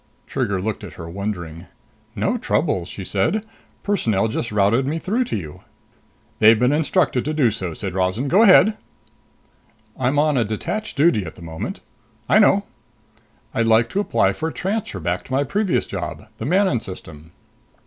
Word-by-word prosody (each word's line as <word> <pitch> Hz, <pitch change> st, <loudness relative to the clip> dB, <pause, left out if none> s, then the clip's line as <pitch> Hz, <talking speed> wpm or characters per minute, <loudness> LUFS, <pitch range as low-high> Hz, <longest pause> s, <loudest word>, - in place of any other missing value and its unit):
Trigger 110 Hz, -8 st, -1 dB
looked 105 Hz, +2 st, -3 dB
at -, -, -8 dB
her, 85 Hz, -, -9 dB
wondering. 90 Hz, -3 st, -5 dB, 0.5 s
"No -, -, 0 dB
trouble," 90 Hz, -3 st, 0 dB
she 95 Hz, +2 st, -8 dB
said. 150 Hz, -, 0 dB, 0.4 s
"Personnel 115 Hz, -, +1 dB
just 115 Hz, +1 st, -3 dB
routed 105 Hz, +6 st, +2 dB
me 155 Hz, +3 st, -1 dB
through 220 Hz, +9 st, -1 dB
to -, -, -3 dB
you." 75 Hz, -6 st, -8 dB, 0.8 s
"They've 110 Hz, +1 st, +7 dB
been 125 Hz, +4 st, +3 dB
instructed 145 Hz, -4 st, +1 dB
to 155 Hz, +1 st, -2 dB
do 130 Hz, -7 st, +3 dB
so," 90 Hz, -6 st, -4 dB
said 95 Hz, 0 st, -5 dB
Rozan. 95 Hz, +8 st, 0 dB
"Go 185 Hz, +9 st, +4 dB
ahead." 215 Hz, 0 st, +7 dB, 1.2 s
"I'm 130 Hz, +3 st, +1 dB
on 145 Hz, -4 st, +3 dB
detached 215 Hz, -, -4 dB
duty 140 Hz, -, +3 dB
at 80 Hz, -, -8 dB
the 85 Hz, -, -13 dB
moment." 80 Hz, -, -6 dB, 0.5 s
"I 215 Hz, -, +5 dB
know." 200 Hz, -1 st, +4 dB, 0.9 s
"I'd 115 Hz, 0 st, +1 dB
like 115 Hz, +1 st, +4 dB
to 195 Hz, -, -1 dB
apply 205 Hz, -, +2 dB
for 160 Hz, -, -3 dB
a -, -, -9 dB
transfer 195 Hz, -, -3 dB
back 85 Hz, +2 st, -2 dB
to 130 Hz, -, -7 dB
my 135 Hz, +2 st, +2 dB
previous 200 Hz, +4 st, 0 dB
job. -, -, -6 dB
The -, -, -4 dB
Manon 185 Hz, -, +2 dB
System." 80 Hz, -6 st, -10 dB
115 Hz, 170 wpm, -21 LUFS, -, 1.2 s, They've